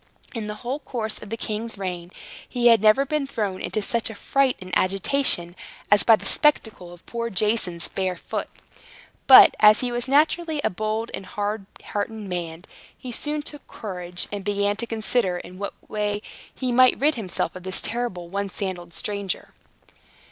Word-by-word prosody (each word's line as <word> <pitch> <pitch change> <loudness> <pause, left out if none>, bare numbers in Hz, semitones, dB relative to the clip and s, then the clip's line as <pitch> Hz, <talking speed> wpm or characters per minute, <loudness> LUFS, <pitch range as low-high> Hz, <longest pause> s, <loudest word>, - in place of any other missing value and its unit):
In 225 -4 -4
the 210 - -4
whole 265 +4 -2
course 225 -6 -4
of 210 - -10
the 225 - -3
king's 220 0 -4
reign, 180 -3 -5 0.4
he 240 -1 +3
had 230 -3 +6
never 215 +6 +5
been 295 0 -1
thrown 205 -8 -3
into 215 - -2
such 235 +2 +1
a 220 - -8
fright 270 +4 +1
and 185 0 -10
agitation 190 -2 +1 0.4
as 205 - +7
by 225 - +7
the 200 - -11
spectacle 220 -8 +2
of 175 0 -15
poor 235 0 -3
Jason's 195 -4 0
bare 185 -1 -2
foot. - - -5 0.8
But, - - +10
as 210 0 +7
he 250 -1 -1
was 240 +1 -2
naturally 310 +3 +2
a - - +1
bold 215 +4 -2
and 190 - -6
hard 205 -1 -3 0.2
hearted 205 +2 -3
man, 180 -5 -5 0.3
he 250 - -7
soon 295 +5 -2
took 295 -1 -6
courage, 180 -4 -5
and 205 -1 -4
began 205 0 0
to 235 +1 -3
consider 220 -4 0
in 180 +1 -10
what 200 - -4
way 210 0 -2 0.3
he 255 -2 -3
might 255 +1 +5
rid 300 +3 +3
himself 200 - -3
of 185 - -8
this 185 +1 0
terrible 230 -8 -3
one 200 +2 -3
sandaled 180 -3 -5
stranger. 200 -3 -3
210 Hz, 175 wpm, -24 LUFS, 190-240 Hz, 0.8 s, But